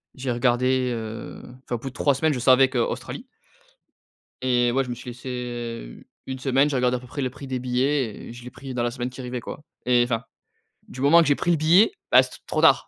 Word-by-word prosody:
j'ai 130 -1 -3
regardé, 125 +1 +1
heu, 110 0 -7 0.2
enfin, 120 - -2
au - - -2
bout 135 +3 -5
de - - -16
3 140 +1 +2
semaines, 155 +3 +1
je 125 - -3
savais 130 +1 +5
que: 130 - -3
Australie. 120 - -3 1.2
Et 120 -1 +2
ouais, 135 +1 +1
je 125 - -7
me - - -2
suis 120 +1 -8
laissé, 125 +2 -9
heu, 120 - -6 0.2
1 130 0 -5
semaine. 135 +2 +2
J'ai 145 - -1
regardé 125 0 +2
à - - -7
peu 125 - -13
près 140 +3 -5
le 130 - -1
prix 135 +2 -10
des 130 -1 -2
billets 125 -1 -1
et - - -8
je 120 0 -11
l'ai 125 - -8
pris 130 +1 -9
dans 120 - -1
la 120 - 0
semaine 125 0 -4
qui 125 - -10
arrivait, 125 0 -4
quoi. 145 - -8 0.2
Et 125 -1 +4
enfin, 115 -2 -1 0.7
du 130 - -9
moment 155 +5 +6
que 160 - +1
j'ai 145 - +4
pris 175 - 0
le 170 - +3
billet, 170 +8 +5 0.2
bah, - - +8
c'était - - -9
trop - - 0
tard. - - +5
125 Hz, 250 wpm, -24 LUFS, 120-135 Hz, 1.2 s, bah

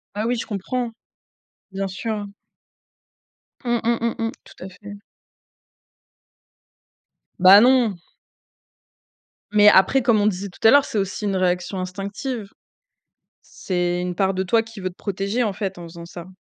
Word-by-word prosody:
Ah 210 +2 -2
oui, 245 - +1
je 230 - -4
comprends. 235 +4 -3 0.8
Bien 195 0 -3
sûr. 205 +2 -4 1.4
Mmh 240 -1 +1
mmh 235 +1 +1
mmh 230 0 -1
mh. - - -4
Tout - - -14
à 190 - -7
fait. 205 +2 -12 2.4
Bah 190 +3 +8
non. 245 -4 +4 1.6
Mais 210 0 +5
après 195 +8 +4
comme 235 -3 +3
on 205 - +2
disait 200 0 -2
tout 180 - -10
à - - +8
l'heure 285 -1 +6
c'est - - -4
aussi 195 +2 -3
une 195 -2 -1
réaction 180 +1 -1
instinctive 200 +5 -5 1.1
c'est 175 -1 -1
une 180 0 -3
part 190 +1 0
de 190 - -1
toi 225 +5 +2
qui 225 -1 -12
veut 185 -1 -4
te - - -23
protéger, 200 +4 -3
en 210 -3 -1
fait, 190 -2 -5
en - - -8
faisant 170 0 -11
ça. 175 +1 -10
200 Hz, 155 wpm, -22 LUFS, 185-225 Hz, 2.4 s, Bah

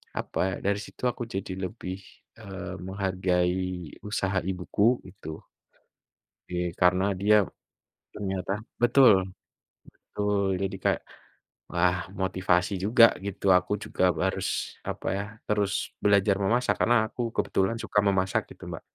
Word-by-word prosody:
apa - - -4
ya, 95 - -2
dari 100 0 +1
situ 105 - -11
aku 120 -1 -6
jadi 95 -3 -5
lebih, 95 -1 -5 0.4
eee, 100 -3 -7
menghargai 95 -1 0 0.5
usaha 95 -2 0
ibuku, 100 +6 +1
gitu 80 -4 -9 1.1
oke, 90 - -4 0.2
karena 90 +2 +4 0.2
dia, 105 +1 +5 0.8
ternyata 95 -2 -3 0.3
betul, 125 -1 +7 0.8
betul 105 -1 -2 0.2
jadi 95 - -2
kayak, - - +2 0.7
wah 90 +1 +2 0.2
motivasi 95 0 +1
juga 115 +2 +7 0.2
gitu, 100 0 -4
aku 90 +3 -5
juga - - -3 0.2
harus, - - -1 0.4
apa - - -5
ya, 100 - -1 0.2
terus 105 -2 +1 0.3
belajar 100 -1 +4
memasak, 120 +6 +2
karena 120 +1 +4
aku 120 - -9 0.2
kebetulan 95 +4 +1
suka 105 - -1
memasak, 95 -1 +1
gitu - - -14
Mbak. - - -6
95 Hz, 125 wpm, -27 LUFS, 95-105 Hz, 1.1 s, betul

